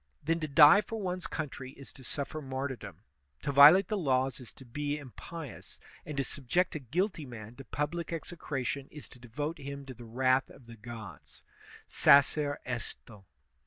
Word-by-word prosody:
Then 165 +2 +1
to 155 - -3
die 150 +7 +8
for 225 +1 -6
one's 185 -2 -3
country 135 -4 -5
is 140 - -12
to 135 - -14
suflEer 145 +4 -4
martyr 130 0 -3
dom, 100 -4 -11 0.4
to 140 - -1
violate 150 +7 +8
the 215 - -1
laws 135 -3 +1
is 125 - -10
to 130 - -14
be 145 +4 -3
impious, 145 - -10 0.3
and 150 -2 -5
to 135 - +2
subject 145 +8 -1
a 155 - -3
guilty 165 - -1
man 115 -1 -9
to 135 - -10
public 150 +8 -3
execration 145 -4 -4
is 150 -2 -11
to 125 - -15
devote 145 +7 -4
him 140 0 -7
to 135 - -8
the 120 0 -12
wrath 130 +3 +2
of 125 - -16
the 115 0 -11
gods: 110 - -11 0.4
Sacer 145 +1 +4
esto. 115 -4 -7
140 Hz, 175 wpm, -31 LUFS, 125-155 Hz, 0.4 s, die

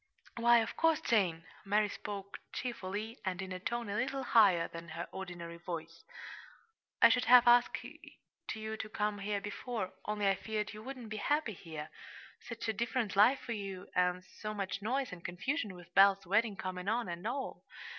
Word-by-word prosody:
"Why, 235 0 +6
of - - -6
course, 325 -2 +3
Jane!" 175 -7 +1 0.2
Mary 210 +1 +2
spoke 200 -1 -6
cheerfully, 220 -1 -4
and 185 -2 -2
in 190 -1 -5
a 185 - -4
tone 235 +4 -2
a 200 - -3
little 265 +4 -1
higher 195 -10 +5
than 165 0 -9
her 170 +2 -5
ordinary 175 -3 -7
voice. 170 -1 -6 1.0
"I 230 - +11
should 245 +1 +3
have 245 +1 +8
asked 240 0 +5
you 220 0 -8
to 215 - -5
come 210 -1 -1
here 205 +1 -1
before, 205 0 -4
only 210 -1 0
I 195 - +5
feared 215 +1 -3
you 215 - -9
wouldn't 250 -1 -7
be 215 - -4
happy 290 +1 0
here 155 -4 -8 0.5
such 230 -1 -6
a 220 - +1
different 235 -1 -1
life 225 +7 +6
for 240 - -6
you, 195 -3 -6
and 180 0 +2
so 215 +3 -7
much 200 -1 -3
noise 260 +5 -1
and 175 -1 -9
confusion 205 - -2
with 175 0 -14
Belle's 195 +1 +6
wedding 210 +4 +2
coming 185 -1 -5
on, 230 0 +1
and 175 +3 -4
all!" 265 +3 -4
205 Hz, 180 wpm, -33 LUFS, 185-230 Hz, 1.0 s, I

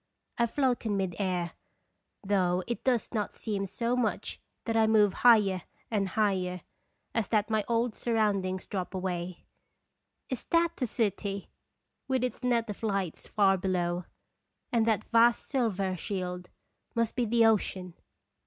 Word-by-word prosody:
I 235 - +4
float 255 0 +1
in 205 -2 0
mid 190 -3 -1
air, 180 -3 -1 0.7
though 185 -2 +1
it 235 - -4
does 250 -3 +1
not 210 -3 -2
seem 200 -3 -2
so 235 +5 -1
much 245 -3 -2 0.2
that 225 - -1
I 220 -1 +4
move 210 -3 +4
higher 210 -6 +5 0.3
and 200 -3 +1
higher, 185 -3 0 0.5
as 225 -3 0
that 215 0 +1
my 215 -1 +2
old 235 0 +1
sur 235 +1 -2
roundings 195 -4 +1
drop 190 -1 -4
away 180 -1 -4 0.8
is 255 - -4
tkati\\e 335 -6 +1
city 200 -3 -2 0.6
with 260 -2 +1
its 250 - -3
net 235 -2 +2
of 210 - -6
lights 195 -6 -2
far 195 -2 +3
below? 180 -1 -1 0.7
and 230 -2 +2
that 215 -1 +2
vast 235 +1 +4
silver 200 -8 0
shield 180 -2 -4 0.5
must 230 -1 0
be 245 - +1
the 230 +1 +4
ocean 190 -5 +1
210 Hz, 145 wpm, -29 LUFS, 185-230 Hz, 0.8 s, higher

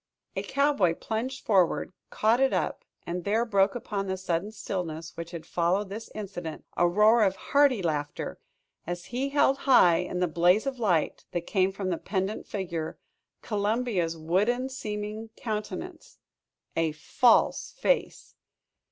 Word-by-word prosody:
A - - -1
cowboy 275 - +2
plunged 245 +7 -4
forward, 185 -3 +2 0.2
caught 225 +3 +2
it 270 0 +3
up, - - -1 0.2
and 175 +1 -3
there 220 +5 +1
broke 200 -2 +2
upon 200 -4 -3
the 190 0 -2
sudden 185 +2 -2
stillness 165 -6 -5
which 170 0 -6
had 170 -2 -8
followed 180 +4 0
this 220 +3 -7
incident, 175 -6 -6
a 175 - +4
roar 215 +5 +5
of 195 -2 +3
hearty 270 0 +3
laughter, 145 -3 -3 0.5
as 175 0 -4
he 265 +3 0
held 275 -1 +3
high 180 -10 +7
in 180 +1 -3
the 180 - +2
blaze 175 - +3
of 270 -2 -3
light 180 -9 +1
that 175 - 0
came 190 -1 +2
from 190 -1 -3
the 170 - -2
pendent 195 +2 -2
figure, 170 -5 -4 0.5
Columbia's 205 -5 0
wooden 210 +11 +1
seeming 215 -3 -5
countenance 240 +10 -5 0.6
a 165 -2 +1
false 230 +10 +3
face! - - 0
200 Hz, 145 wpm, -28 LUFS, 175-230 Hz, 0.6 s, high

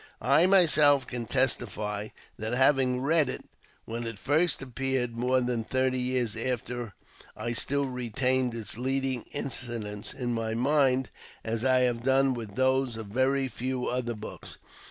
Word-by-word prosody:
I 140 +9 +4
myself 150 -8 +5
can 120 -2 -5
testify 110 -5 0 0.3
that, 110 +2 -4
having 130 -1 +3
read 150 0 +3
it - - -6 0.4
when 115 +1 -4
it 115 -2 -6
first 155 - +1
appeared, 130 -2 -2
more 125 +2 +1
than 120 -2 -1
thirty 130 +2 0
years 125 -3 0
after 120 -2 -3 0.4
I 115 +2 -3
still 140 +4 0
retained 125 0 -1
its 115 0 -4
leading 130 -1 -1
incidents 115 -6 -4
in 120 -2 -2
my 115 -1 -2
mind 130 0 +2 0.3
as 115 +1 -2
I 130 -1 +4
have 120 -2 +1
done 135 +1 +3
with 110 -5 -7
those 130 -2 +1
of 110 -2 -7
very 130 +4 +1
few 125 +1 -3
other 120 -1 -2
books. 105 +1 -9
125 Hz, 150 wpm, -28 LUFS, 115-135 Hz, 0.4 s, myself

